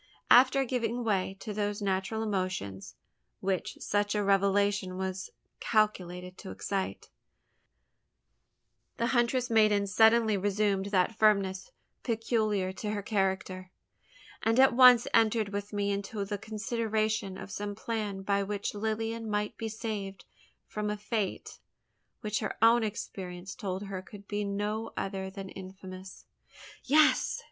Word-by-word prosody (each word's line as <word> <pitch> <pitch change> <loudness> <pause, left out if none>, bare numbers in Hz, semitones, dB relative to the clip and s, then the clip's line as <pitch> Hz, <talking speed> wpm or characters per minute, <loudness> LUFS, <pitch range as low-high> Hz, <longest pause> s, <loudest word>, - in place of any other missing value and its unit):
After 260 +2 +7
giving 245 -1 -1
way 195 -3 0
to 215 - -5
those 205 0 -2
natural 200 +2 -1
emotions, 185 - -3 0.4
which 190 -1 -2
such 205 0 0
a 210 - +1
revelation 200 -1 +2
was 190 0 -3 0.3
calculated 180 -4 0
to 190 - -8
excite, 195 -1 -4 1.9
the 230 - 0
huntress 245 0 +1
maiden 215 -2 +4
suddenly 220 +1 +4
resumed 200 0 0
that 200 +2 +1
firmness 195 -3 +2 0.3
peculiar 215 -5 0
to 210 +2 -4
her 205 -1 -3
character; 190 -2 -1 0.7
and 225 +2 +2
at 265 -1 +6
once 250 -1 +8
entered 220 -2 +3
with 205 0 -4
me 205 -1 0
into 200 +1 -3
the 205 0 -4
consideration 215 -2 -1
of - - -8
some 205 +1 -4
plan 210 -3 -3
by 200 0 +1
which 200 0 -3
Lilian 225 +1 -2
might 210 0 -1
be 225 -1 -4
saved 210 -3 -5 0.4
from 210 0 -3
a 210 - -2
fate 210 -1 -3 0.6
which 210 0 -1
her - - -4
own 230 +1 +5
experience 190 -3 -5
told 190 -1 -4
her 195 -2 -5
could 200 +1 -13
be 205 0 -2
no 210 +2 -3
other 190 -1 -3
than 195 0 -8
infamous. 185 0 -10 0.6
"Yes!" 305 +3 +4
205 Hz, 130 wpm, -30 LUFS, 195-220 Hz, 1.9 s, once